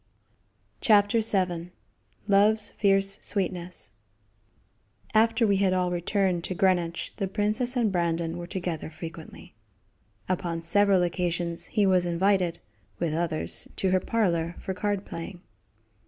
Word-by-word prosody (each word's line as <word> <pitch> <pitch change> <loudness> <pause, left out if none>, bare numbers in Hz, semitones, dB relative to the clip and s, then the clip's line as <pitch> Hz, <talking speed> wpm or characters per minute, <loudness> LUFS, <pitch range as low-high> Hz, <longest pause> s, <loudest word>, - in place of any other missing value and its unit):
CHAPTER 210 -1 +4
VII 180 -5 0 0.6
Love's 210 +1 +4
Fierce 195 0 +2
Sweetness 180 - -2 1.2
After 225 +2 +4
we 200 -2 +3
had 190 -1 +2
all 180 -1 +1
returned 180 0 0
to 185 - -4
Greenwich 175 -3 0
the 195 - -1
princess 215 +6 0
and 225 -4 +2
Brandon 170 -1 -1
were 175 - -6
together 175 -4 -4
frequently. 160 0 -10 0.7
Upon 170 -2 -2
several 195 +1 +3
occasions 170 -1 -2
he 210 - +1
was 185 -2 +3
invited, 175 0 +1 0.4
with 170 -3 -1
others, 160 -1 -1
to 190 - 0
her 185 - +4
parlor 175 -6 0
for 190 - -4
card 205 +1 -2
playing. 175 +2 -7
185 Hz, 125 wpm, -27 LUFS, 170-205 Hz, 1.2 s, CHAPTER